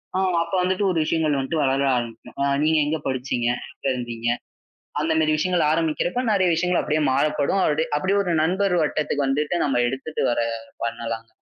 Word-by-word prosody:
ஆ, - - +2 0.2
அப்ப 170 - -11
வந்துட்டு 185 +2 0
ஒரு 165 - 0
விஷயங்கள் 155 -3 +1
வந்துட்டு 150 +3 -1
வளர 135 +1 +1
ஆரம்பிக்கும். 115 -1 -6
ஆ, - - +2 0.2
நீங்க 160 0 +3
எங்க 155 +1 -1
படிச்சீங்க, 125 -2 -1 0.3
எங்க - - -18
இருந்தீங்க 120 -1 -3 0.7
அந்த 160 +2 +1
மாதிரி 155 -1 +2
விஷயங்கள் 175 +1 +1
ஆரம்பிக்கிறப்ப, 165 +8 0
நிறைய 190 -2 +3
விஷயங்கள் 180 +2 +1
அப்படியே 155 0 0
மாறப்படும். 150 +6 +1
அப்படி 155 +2 +1
அப்படியே 190 +6 +1
ஒரு 175 - 0
நண்பர் 185 +3 +1
வட்டத்துக்கு 150 -2 0
வந்துட்டு 150 +5 0
நம்ம 135 -3 +1
எடுத்துட்டு 135 +4 -3
வர 120 - 0 0.4
பண்ணலாங்க. 115 -1 -4
155 Hz, 170 wpm, -23 LUFS, 135-170 Hz, 0.7 s, நீங்க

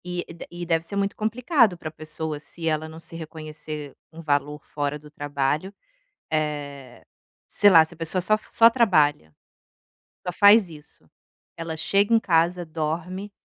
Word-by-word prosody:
E 180 0 -4
de 170 - -10
e 175 0 -7
deve 165 -1 +1
ser 200 - -6
muito 200 0 -1
complicado 230 - +2
pra 155 -2 -7
pessoa, 155 -1 -6
se 165 +2 -7
ela 155 0 -1
não 160 +1 -10
se 165 - -9
reconhecer 155 -2 -8 0.2
um 165 0 -10
valor 150 -1 -1
fora 145 0 -3
do 150 0 -16
trabalho. 145 +5 -2 0.6
Eh, 145 -3 -4 0.4
sei 205 - +4
lá, 165 -3 +8
se 160 +2 -10
a - - -26
pessoa 165 +3 -1
só 215 +4 +3
f 215 - -10
só 230 0 +7
trabalha, 150 - +2 0.9
só 180 - -2
faz 205 0 +6
isso, 150 - -16 0.5
ela 165 -1 -5
chega 200 +7 +2
em - - +5
casa, 175 -2 +1
dorme, 165 +5 -4
160 Hz, 165 wpm, -24 LUFS, 150-185 Hz, 0.9 s, lá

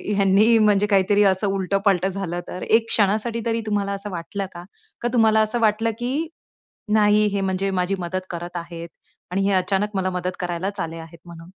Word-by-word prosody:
ह्यांनी 200 +4 +4
म्हणजे 210 -1 +3
काहीतरी 200 +1 +3
असं 195 +1 +2
उलट 195 0 -1
पलटं 190 -1 +3
झालं 180 -2 -4
तर, 180 - -7
एक 225 0 +2
क्षणासाठी 220 +3 +1
तरी 230 0 0
तुम्हाला 205 -2 -1
असं 200 +1 -6
वाटलं 185 +3 -4
का? 175 0 -9 0.4
का 240 - 0
तुम्हाला 220 -2 +4
असं 215 +2 0
वाटलं 225 +1 +2
की, 275 +7 -2 0.7
नाही 210 0 +4
हे 200 - -1
म्हणजे 195 0 -1
माझी 185 +1 0
मदत 185 +1 -3
करत 175 +1 -6
आहेत 170 0 -7 0.4
आणि 195 +2 0
हे - - +2
अचानक 195 +2 0
मला 185 0 0
मदत 180 0 -3
करायलाच 180 +3 -3
आले 165 0 -4
आहेत 165 +1 -11
म्हणून? 165 -1 -11
195 Hz, 185 wpm, -22 LUFS, 180-210 Hz, 0.7 s, ह्यांनी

